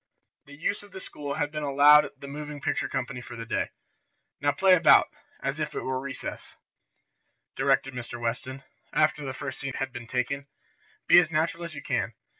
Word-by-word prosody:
The 145 - -13
use 170 +7 -2
of 205 -1 -16
the - - -7
school 145 -5 -6
had 145 0 -1
been 150 0 -4
allowed 145 +1 +6
the 140 - -9
moving 150 +1 -6
picture - - -1
company 125 -1 -3
for 120 0 -9
the 115 -1 -6
day. - - -1 0.7
"Now 145 0 +2
play 185 +6 +4
about, 180 - +6 0.3
as 135 +3 -2
if 150 0 -3
it - - -2
were 130 0 -2
recess," 135 0 -6 1.0
directed 135 - +2
Mr. 120 -1 -6
Weston, 130 +3 -3 0.3
after 155 -1 +2
the 135 - -3
first 130 0 -6
scene 135 -1 -4
had 135 -1 -3
been 120 -2 -7
taken. 135 +4 -2 0.6
"Be 175 - +8
as 170 -3 +2
natural 165 +2 0
as 165 -2 -8
you - - -7
can. - - -1
140 Hz, 190 wpm, -27 LUFS, 130-150 Hz, 1.0 s, Be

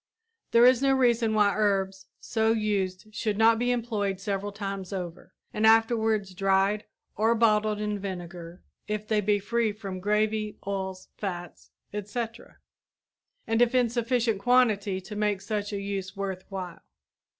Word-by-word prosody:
There 235 +1 +6
is 255 0 +5
no 270 -1 +4
reason 235 -4 +2
why 205 -1 +4
herbs 195 -2 0
so 225 0 +1
used 205 -2 -2
should 210 -1 -1
not 225 +1 +5
be 245 +1 +1
employed 215 -6 -1
several 200 +1 -3
times 195 -2 -5
over, 180 -3 -6 0.2
and 215 - -2
afterwards 220 -3 +3
dried 195 +2 +1 0.3
or 225 +2 +3
bottled 215 -2 +2
in 210 -1 -2
vinegar 175 -2 -7 0.2
if 210 0 -3
they 215 -1 +2
be 205 0 +2
free 225 +2 0
from 195 -3 -6
gravy, 210 +2 0
oils, 190 -1 -4
fats, 175 -3 -6 0.2
etc., 225 +3 -5 0.9
and 225 +1 +1
if 245 +1 +3
in 245 -2 +4
sufficient 235 -2 0
quantity 215 -5 +3
to 200 +3 -9
make 210 -1 0
such 205 +1 -3
a 200 - -3
use 195 -1 -4
worth 190 -2 -4
while. 185 -3 -6
210 Hz, 150 wpm, -27 LUFS, 195-225 Hz, 0.9 s, There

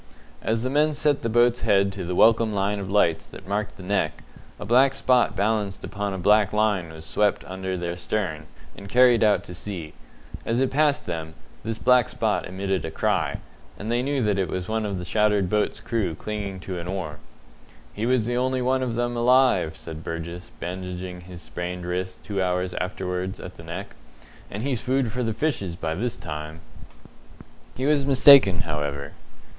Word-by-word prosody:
As 110 +1 0
the 130 - -1
men 150 +1 +2
set 145 -1 +1
the 115 - -1
boat's 120 +1 +3
head 100 0 +3
to 95 -1 -5
the 90 +1 -3
welcome 115 +1 +5
line 100 +1 0
of 95 -2 -5
lights 85 -5 +2
that 95 - -12
marked 105 +1 -2
the 95 - -10
Neck, 100 +2 -1 0.4
a 105 - -6
black 130 +5 +4
spot 125 -2 +2
balanced 105 -1 -1
upon 100 0 -3
a 95 - -4
black 105 +2 +4
line 105 -5 +1
was 80 0 -10
swept 105 +7 +1
under 95 0 -4
their 85 0 -3
stern 85 -4 -3 0.3
and 100 - -10
carried 125 -1 +5
out 105 -1 +3
to 90 - -9
sea. 85 -4 -6 0.5
As 115 +2 0
it 130 -1 +1
passed 145 0 +2
them, 80 -2 -5 0.3
this 110 +1 -4
black 125 0 +4
spot - - -1
emitted 95 -1 -2
a 80 - -3
cry, - - 0 0.4
and 110 +3 -4
they 120 +1 +2
knew 135 0 0
that 105 -2 +1
it 95 -4 0
was 90 +1 -3
one 110 -1 -1
of 100 -2 -3
the 90 - -5
shattered 105 -1 +2
boat's 105 0 +1
crew 110 -8 -2
clinging 100 0 -5
to 90 -1 -5
an 85 - -6
oar. 90 -5 -4 0.7
"He 110 +3 -2
was 125 -3 +2
the 120 +1 -1
only 130 0 0
one 130 +1 +1
of 120 -3 -2
'em 120 0 -1
alive," 125 -9 +3
said 80 -1 -8
Burgess, 85 +2 -6
bandaging 90 0 -5
his 85 -1 -11
sprained 90 +2 -5
wrist 90 +1 -4
two 100 -2 -2
hours 90 0 0
afterwards 90 0 -3
at 90 - -8
the 85 - -13
Neck, 90 +5 -7 0.6
"and 105 +3 -5
he's 130 -4 -1
food 130 -2 0
for 125 +3 -3
the 115 -2 0
fishes 110 - -2
by 80 -2 -3
this 115 +8 -2
time!" 75 +2 -7 1.1
He 130 - -2
was 145 -1 +3
mistaken, 135 -8 +7
however. 75 -2 -3
100 Hz, 190 wpm, -25 LUFS, 90-120 Hz, 1.1 s, mistaken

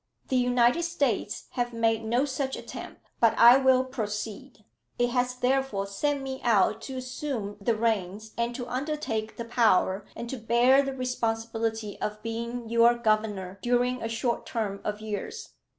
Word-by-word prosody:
"The 260 - +1
United 245 +3 +3
States 280 - -1
have 245 -1 -2
made 225 -1 +1
no 240 +5 +1
such 270 -1 -2
attempt; - - -9 0.2
but 230 -2 +4
I 240 +2 +9
will 260 -1 +4
proceed. 220 -1 -5 0.3
It 245 0 +1
has 250 0 0
therefore 250 -5 0
sent 275 +8 -1
me 265 0 -5
out 220 -1 +3
to 265 - -5
assume 255 -5 -4
the 225 +3 +1
reins, 215 -1 -1
and 235 +1 -1
to 245 -1 -5
undertake 255 -5 -3
the 235 - -4
power, 210 -4 +2
and 235 - -6
to 265 - -4
bear 240 +4 +4
the 275 -1 -3
responsibility 225 -3 -2
of 210 0 -4
being 235 +1 -4
your 235 +1 +5
governor 215 -4 0
during 245 +1 +1
a 225 - -3
short 235 +1 -2
term 205 -4 -3
of 210 0 -3
years. 220 - -5
235 Hz, 160 wpm, -27 LUFS, 220-255 Hz, 0.3 s, I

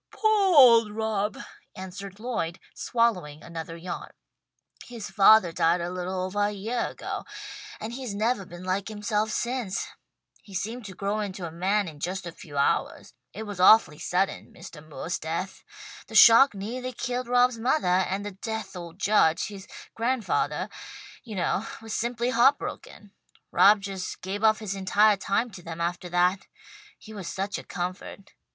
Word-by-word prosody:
"Poah 415 -4 +2
old 230 -5 +8
Rob," 215 -1 -2 0.4
answered 195 +1 -8
Lloyd, 215 -8 -3 0.2
swallowing 180 -11 -1
another 165 0 -7
yawn. 175 +1 -6 0.8
"His 235 -4 -8
fathah 200 -4 +6
died 165 +2 +2
a 170 +1 -3
little 185 +1 -3
ovah 205 +2 0
a - - -2
yeah 220 +4 -2
ago, - - -6 0.6
and 225 +2 -6
he's 250 -5 -5
nevah 215 -1 0
been 175 +1 -10
like 185 +2 -1
himself 215 0 -1
since. 235 -3 -2 0.5
He 195 - -13
seemed 225 +5 -4
to 190 -2 -9
grow 200 +2 -2
into 195 -3 -4
a 165 - -6
man 190 +4 0
in 155 -3 -10
just 185 +4 -4
a 170 - -5
few 145 -3 -11
hours. 140 - 0 0.2
It 220 - -7
was 205 -3 -7
awfully 180 -5 +6
sudden 190 +2 -1
Mistah 150 - -12
Moore's 155 +2 -5
death. 170 +4 -4 0.4
The - - -10
shock 235 +4 +8
neahly 245 +5 -5
killed 250 0 -3
Rob's 245 -1 +3
mothah, 190 -7 +2
and 195 +2 -3
the 205 - -4
deah 220 +2 -5
old 170 -2 -9
judge, 195 -5 +2
his 200 -2 -10 0.3
grandfathah, 235 -2 -1 0.5
you 220 -4 -8
know, 190 +3 -1
was 225 -1 -7
simply 235 +1 -1
heartbroken. 240 -4 0 0.4
Rob 205 +1 +6
just 195 -2 -5
gave 195 +3 -4
up 215 -1 +5
his 210 -3 -4
entire 200 +2 +3
time 200 +5 -1
to 185 - -10
them 165 -1 -7
aftah 175 +1 -3
that. 180 +2 +1 0.5
He 220 - -13
was 195 -5 -7
such 195 +2 -3
a - - -10
comfort. 185 +2 -6
200 Hz, 160 wpm, -26 LUFS, 180-225 Hz, 0.8 s, old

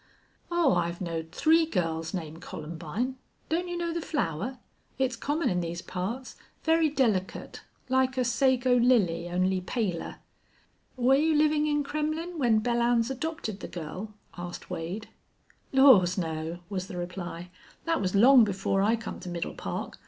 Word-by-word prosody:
"Oh, 345 - +3
I've 175 -1 -1
knowed 165 -2 -4
three 320 - +4
girls 165 - -1
named 165 -3 -5
Columbine. 170 +14 -4 0.3
Don't 345 +3 0
you 350 0 -3
know 340 -1 -2
the 340 - -2
flower? 250 - -2 0.4
It's 260 -1 0
common 295 +7 -1
in 180 -1 +1
these 170 0 -4
parts. 230 +9 -5 0.3
Very 320 -1 +3
delicate, 225 -10 -1 0.3
like 260 0 +2
a 255 - +2
sago 255 +1 +3
lily, 195 -9 +3
only 185 +1 +1
paler." 185 -3 -2 0.8
"Were 250 +2 +4
you 310 +3 +3
livin' 300 0 +3
in 295 -1 +1
Kremmlin' 310 +4 -3
when 230 -5 +3
Belllounds 235 +1 +2
adopted 265 - -4
the - - -6
girl?" 185 +6 -7 0.2
asked 175 0 -7
Wade. 180 +7 -4 0.6
"Laws 240 -10 +6
no!" 165 0 -3
was 190 -2 -4
the 185 - -7
reply. 175 -1 -6 0.3
"Thet 330 0 +1
was 185 0 -1
long 245 +4 +8
before 195 -1 0
I 215 +4 +3
come 225 -1 -7
to 185 - -7
Middle 175 -1 -3
Park. - - -5
225 Hz, 150 wpm, -28 LUFS, 175-275 Hz, 0.8 s, long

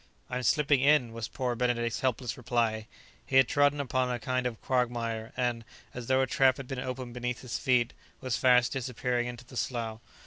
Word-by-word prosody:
"I'm 125 0 -1
slipping 145 +3 +3
in," 140 -5 +4
was 115 -1 -4
poor 125 +1 -2
Benedict's 120 -1 0
helpless 125 -3 -1
reply. 115 -3 -1 0.4
He 130 - -4
had 130 -2 +7
trodden 145 0 +3
upon 130 -2 0
a 125 - -1
kind 125 +1 -1
of 115 -3 -6
quagmire 120 -3 -1
and, 120 -2 0 0.3
as 125 -2 -7
though 130 0 +3
a - - +3
trap 130 +1 +3
had 135 - -7
been 135 -1 -4
opened 130 -1 -5
beneath 125 0 -3
his 125 -2 -4
feet, 125 -2 +2 0.3
was 130 -2 -2
fast 125 -2 +4
disappearing 125 -1 -1
into 120 0 -8
the 125 - -10
slough. 115 -3 -3
125 Hz, 195 wpm, -29 LUFS, 120-130 Hz, 0.4 s, had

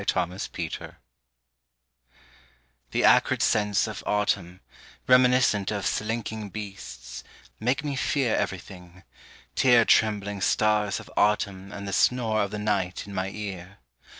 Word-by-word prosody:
DOLOR 90 0 0
OF 95 - -5
AUTUMN - - -5 1.9
THE - - 0
acrid - - +4
scents 105 -1 +2
of 110 -3 -6
autumn, 100 -3 -1 0.5
Reminiscent 125 -5 +4
of 100 -3 -3
slinking 110 -1 -3
beasts, 65 - -8 0.4
make 125 +5 0
me 145 -2 -3
fear 135 -4 0
Everything, 90 -2 -5 0.5
tear 120 -3 +5
trembling 105 -3 +2
stars 105 +1 +1
of - - -13
autumn 100 -2 0
And 100 -1 -7
the 100 - -4
snore 115 -2 +2
of 100 - -1
the 105 - -5
night 105 -3 -1
in 100 - -10
my 95 0 -2
ear. 100 -2 -7
105 Hz, 125 wpm, -26 LUFS, 95-110 Hz, 1.9 s, tear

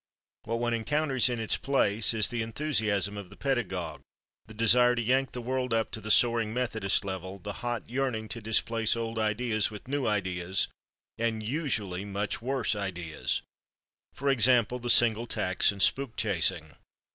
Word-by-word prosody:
What 115 +1 -2
one 120 0 -1
encounters 135 +2 +1
in 120 -2 -2
its 110 - 0
place 115 -6 +2
is 110 -2 +2
the 120 -1 -2
enthusiasm 110 - -1
of 100 -3 -8
the - - -14
pedagogue, 95 - -3 0.5
the 110 - -11
desire 120 +2 +5
to 120 - -1
yank 130 +3 +1
the 125 - -6
world 125 -1 -1
up 110 -1 -1
to 110 - -5
the 110 - -7
soaring 115 -1 +3
Methodist 110 -6 0
level, 95 0 -6
the 105 +2 -7
hot 120 -1 -3
yearning 125 -3 -2
to 115 - -5
displace 110 +1 +1
old 115 -1 -4
ideas 110 0 0
with 105 +2 -11
new 140 -1 -1
ideas, 95 -3 -1 0.5
and 115 -1 -1
usually 110 - -2
much 100 +1 -3
worse 125 -3 0
ideas, 90 -5 -3 0.7
for 140 0 0
example, 125 -1 +4
the 120 0 -4
Single 120 -1 +5
Tax 95 -3 +2
and 100 -1 0
spook 135 -4 +3
chasing. 90 -6 0
115 Hz, 165 wpm, -28 LUFS, 100-125 Hz, 0.7 s, desire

